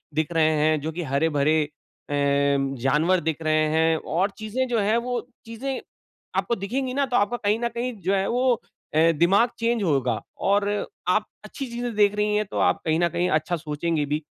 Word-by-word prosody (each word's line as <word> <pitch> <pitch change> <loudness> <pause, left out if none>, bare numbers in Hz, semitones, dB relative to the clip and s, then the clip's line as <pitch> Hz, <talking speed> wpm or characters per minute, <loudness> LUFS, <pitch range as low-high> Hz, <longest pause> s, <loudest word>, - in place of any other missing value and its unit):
दिख 155 +1 0
रहे 160 -1 +3
हैं 155 0 +3
जो 160 +2 -3
कि 175 - -5
हरे-भरे 150 +1 +2 0.5
अ, - - -3 0.7
जानवर 160 +7 +3
दिख 160 0 -1
रहे 155 0 +2
हैं 160 +1 +2
और 180 +7 0
चीज़ें 230 +4 -2
जो 235 -2 0
हैं 210 +2 +2
वो 245 +1 -1 0.3
चीज़ें 255 +4 -4 0.6
आपको 235 - +1
दिखेंगी 250 +6 -3
ना 280 0 +1
तो 245 - -3
आपको 205 +4 +1
कहीं 210 +1 0
न 235 - 0
कहीं 240 +1 -3
जो 185 +3 0
है 195 0 0
वो 250 +1 +3
अ, 165 -5 0
दिमाग़ 185 +9 +3
चेंज 230 -2 +1
होगा 130 - +1 0.2
और 200 +1 +2 0.4
आप 210 +4 +2 0.2
अच्छी 270 +6 -6
चीज़ें 240 0 -3
देख 205 -1 +4
रही 210 0 +1
है 210 - +2
तो 195 - -5
आप - - +2
कहीं 160 +1 +2
न 175 0 +2
कहीं 175 +3 0
अच्छा 155 +3 +1
सोचेंगे 155 0 -2
भी, 150 +2 -2
185 Hz, 195 wpm, -24 LUFS, 155-230 Hz, 0.7 s, देख